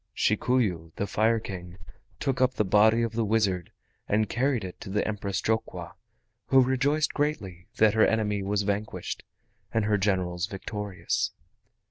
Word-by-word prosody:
Shikuyu, 105 -7 +1
the 100 - -1
Fire 110 +3 +2
King, 90 -4 -8 0.4
took 130 -1 -1
up 130 0 +3
the 105 - +1
body 110 +4 +4
of 115 - -1
the 115 0 0
wizard 100 -5 0 0.4
and 105 +1 +2
carried 130 -2 0
it 90 -1 -8
to 105 - -7
the 105 +2 0
Empress 100 -2 -2
Jokwa, 110 0 -2 0.6
who 135 - +6
rejoiced 135 +4 +2
greatly 100 - -2
that 110 -1 +5
her 110 - +5
enemy 105 -2 0
was 100 +1 0
vanquished, 105 +1 -3 0.5
and 115 -2 +1
her 105 -1 +2
generals 90 -3 0
victorious. 100 0 -3
105 Hz, 150 wpm, -27 LUFS, 95-115 Hz, 0.6 s, who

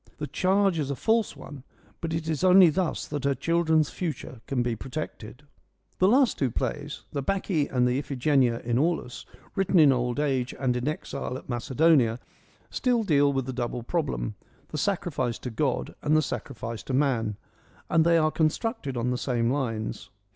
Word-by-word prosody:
The 150 - -3
charge 190 +1 +2
is 140 -2 -2
a 140 - -1
false 220 - +1
one, 140 -4 -10 0.4
but 165 - -4
it 160 0 -3
is 160 +1 -1
only 185 -2 +7
thus 180 +1 -1
that 145 -2 -4
her 140 -1 +1
children's 160 +1 +2
future 145 -8 -5
can 125 -3 0
be 120 -1 -1
protected. 130 -1 -7 0.6
The 185 - +5
last 255 +3 +3
two 135 - +2
plays, - - -4
the 140 - -2
Bacchae 180 -2 0
and 125 -1 +1
the 125 +2 +1
Iphigenia 135 -3 +1
in 120 +1 +1
Aulis, 155 -5 -1 0.3
written 195 -2 +1
in 150 -4 +7
old 125 +1 0
age 130 -4 0
and 130 -2 +1
in 125 +2 -2
exile 150 -4 -4
at - - -13
Macedonia, 130 -1 +3 0.5
still 245 -3 +1
deal 145 -7 +3
with 135 -2 -1
the 130 - -4
double 120 -1 -3
problem, 145 -6 -2 0.4
the 155 - -5
sacrifice 145 - -1
EURIPIDES - - -7
in - - -28
to 125 - -3
God 140 -2 -1
and 155 +1 +3
the 155 - +3
sacrifice 115 -6 -5
to 130 - -3
man; 120 -7 +1 0.5
and 165 -1 +3
they 170 0 +4
are 155 -1 +3
constructed 155 - -1
on 120 +1 0
the 125 - -1
same 120 -2 0
lines. 115 -6 -3
140 Hz, 185 wpm, -27 LUFS, 125-165 Hz, 0.6 s, only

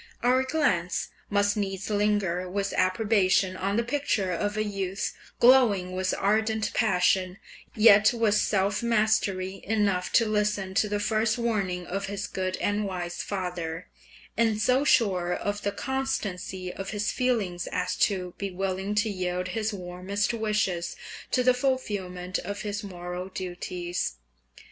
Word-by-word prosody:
Our 250 +2 +4
glance 255 - 0 0.2
must 205 0 +2
needs 195 -2 -3
linger 205 -4 +1
with 200 +1 -2
approbation 185 -1 +2
on 195 +2 -1
the 235 - +2
picture 235 -7 0
of 205 +4 -1
a 215 - +2
youth 195 -2 -3 0.3
glowing 235 -8 +5
with 185 0 0
ardent 220 +2 +1
passion, 185 -3 +2 0.4
yet 210 -2 +7
with 230 -3 +2
self 200 0 +1
mastery 210 -5 +1
enough 200 -4 0
to 230 - +5
listen 210 -3 0
to 210 +2 +2
the 205 0 -1
first 220 +1 +1
warning 200 -7 -1
of 195 +3 -3
his 200 0 -3
good 185 -2 -3
and 205 +1 0
wise 175 -2 -4
father, 180 -3 -4 0.5
and 225 -2 +2
so 255 +5 +3
sure 185 -10 +2
of 205 0 -3
the 200 - -1
constancy 200 -7 -3
of 195 0 -6
his 210 -1 -1
feelings 215 -9 -1
as 180 0 -1
to 185 -3 +1
be 200 - -2
willing 190 +2 -2
to 210 +2 +2
yield 180 -1 -2
his 220 +3 -1
warmest 190 +3 -2
wishes 210 -6 -1 0.3
to 250 - +2
the 255 0 +5
fulfilment 200 -9 -2
of 200 +1 -5
his 205 -1 -3
moral 180 -1 -6
duties. 175 - -4
200 Hz, 145 wpm, -27 LUFS, 185-215 Hz, 0.5 s, yet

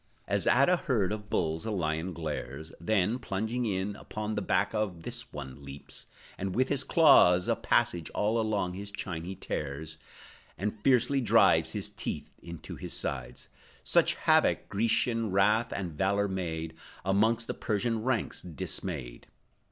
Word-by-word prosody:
As - - 0
at 135 +3 +5
a 180 - +4
herd 110 - 0
of 105 -1 -5
bulls 80 -1 0
a 110 - -3
lion 85 -3 -1
glares, 80 -1 -5
Then, 105 +6 +1
plunging 110 +2 -2
in, 100 0 -1
upon 105 +1 -5
the 105 - -1
back 100 0 +1
Of 100 -6 -2
this 120 0 -5
one 70 -1 -8
leaps, 70 +1 -8 0.3
and 95 -1 -3
with 130 +1 +2
his 140 -2 +2
claws 135 - +6
A - - +2
passage 85 -3 +1
all 110 +2 +1
along 105 -5 -1
his 100 +2 -7
chine 90 -5 -5
he 95 +2 -5
tears, 75 0 -5 0.6
And 105 +2 -1
fiercely 125 +4 +2
drives 115 -1 +4
his - - -3
teeth - - -6
into 85 -2 -8
his - - -4
sides, 60 -2 -4 0.4
Such - - +3
havoc - - +3
Grecian 115 +1 +1
wrath 105 +4 +3
and 90 -4 -3
valor 100 +5 +1
made 80 -4 -3 0.3
Amongst 110 +4 +2
the - - -3
Persian 110 +1 -1
ranks, 120 -2 -1
dismayed. 75 -6 -5
100 Hz, 155 wpm, -30 LUFS, 85-110 Hz, 0.6 s, claws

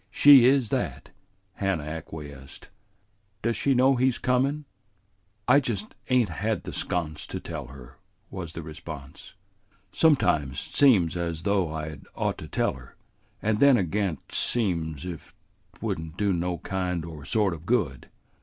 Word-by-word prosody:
"She 135 +3 +8
is 130 -3 +4
that," - - -3 0.4
Hannah 95 -5 -1
acquiesced. 75 -3 -8 0.7
"Does 115 +1 +1
she 135 +6 +2
know 130 +1 +4
he's 130 0 +2
comin'?" 135 +4 0 0.8
"I 135 +3 +7
just 110 -6 -3 0.2
ain't 125 -5 +3
had 105 +4 -2
the - - -7
sconce 80 -4 -3
to - - -4
tell 80 -6 -6
her," 65 -1 -13 0.3
was 85 -4 -6
the 80 - -6
response. 75 -3 -10 0.6
"Sometimes 90 - +2
't - - -11
seems 105 - +5
just 90 - -3
as 85 -1 -4
though 100 -5 +1
I'd 75 -1 -5
ought - - -1
to - - -8
tell - - 0
her, - - -14 0.5
and 110 0 +1
then 140 -3 +6
agen 95 -3 -1
't - - -19
seems 85 - 0
if 85 -3 -8 0.4
't - - -15
would - - -1
n't 80 +1 -9
do 100 -2 +1
no 90 0 -1
kind 90 -1 -3
or 80 -4 -9
sort 100 +3 +1
of 80 +1 -10
good. 90 - 0
90 Hz, 160 wpm, -26 LUFS, 80-115 Hz, 0.8 s, She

